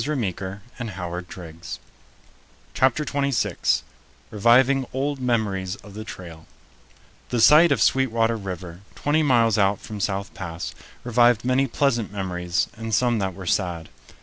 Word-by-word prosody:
] - - -2 2.7
CHAPTER 135 +3 +2
TWENTY 140 -1 0
SIX 130 - +1 0.5
REVIVING 125 +5 +4
OLD 140 +2 -1
MEMORIES 100 -6 0
OF 105 -2 -14
THE 110 +1 -6
TRAIL 85 -6 -10 0.8
THE 120 - 0
sight 155 +7 +7
of 140 - +2
Sweetwater 115 -3 +2
River, 90 -4 -7 0.2
twenty 150 +2 +1
miles 115 -7 +3
out 100 0 +2
from 105 -1 -8
South 100 +1 -2
Pass, 85 -2 -6 0.3
revived 120 -1 +3
many 130 +2 +2
pleasant 120 -5 0
memories 90 -3 -1
and 115 -1 -2
some 120 0 +2
that 95 -3 -2
were 95 -1 -8
sad. 85 -3 -1
115 Hz, 125 wpm, -24 LUFS, 95-130 Hz, 2.7 s, sight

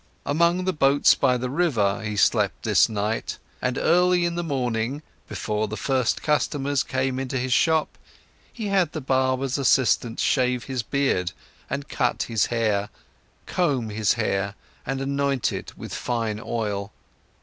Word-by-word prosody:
Among 170 +5 +2
the 185 - +1
boats 140 -2 +4
by 130 -2 +2
the 125 +1 -3
river, 120 - +1
he 105 -1 -3
slept 90 - +2
this - - +4
night, 105 +1 -2 0.2
and 125 0 -1
early 180 +1 +3
in 170 - -1
the 175 - -2
morning, 130 -2 -2 0.3
before 105 0 -2
the 110 +1 -5
first 130 -4 0
customers 145 -2 +1
came 130 0 -1
into 135 0 -3
his 125 0 0
shop, 160 +3 +2 0.5
he 220 -4 -5
had 190 -5 +2
the 155 - -3
barber's 130 0 0
assistant 125 -3 +2
shave 125 -1 +1
his 130 -3 -3
beard 110 -7 0 0.4
and 140 +1 -3
cut 125 -3 0
his 115 -3 0
hair, 105 -4 0 0.6
comb 135 -11 0
his 105 -1 +2
hair 100 -3 -1 0.3
and 135 +1 -2
anoint 140 -1 0
it - - -7
with - - -8
fine 115 -3 -2
oil. 105 -3 -3
130 Hz, 150 wpm, -24 LUFS, 115-145 Hz, 0.6 s, boats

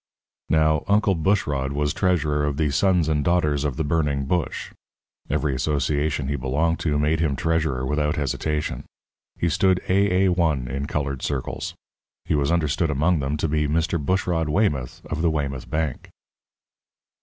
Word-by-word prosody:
Now, 80 -1 +3
Uncle 105 0 +3
Bushrod 75 -6 0
was 75 0 0
treasurer 75 -6 +1
of 70 -1 -2
the 75 -2 +1
Sons 90 +3 +2
and 75 -2 +1
Daughters 75 -4 +1
of 70 -4 -1
the 80 - -1
Burning 75 -3 0
Bush. 85 0 -2 0.6
Every 75 -1 0
association 75 +1 0
he 70 - -1
belonged 70 +6 0
to 75 -3 0
made 75 +2 +1
him 80 -4 +1
treasurer 80 -4 0
without 75 +2 0
hesitation. 75 +1 -2 0.5
He 85 - 0
stood 95 +3 +2
AA1 90 -8 +2
in 70 +3 -3
coloured 70 -3 -2
circles. 70 -3 -3 0.5
He - - -1
was 70 0 +1
understood 80 0 +1
among 80 +4 +2
them 70 +2 -1
to 80 - 0
be 75 0 +1
Mr. 80 +1 0
Bushrod 85 -1 0
Weymouth, 75 - 0
of 75 - -3
the 85 - +3
Weymouth 70 -4 -3
Bank. 80 -4 -2
75 Hz, 155 wpm, -23 LUFS, 70-85 Hz, 0.6 s, Now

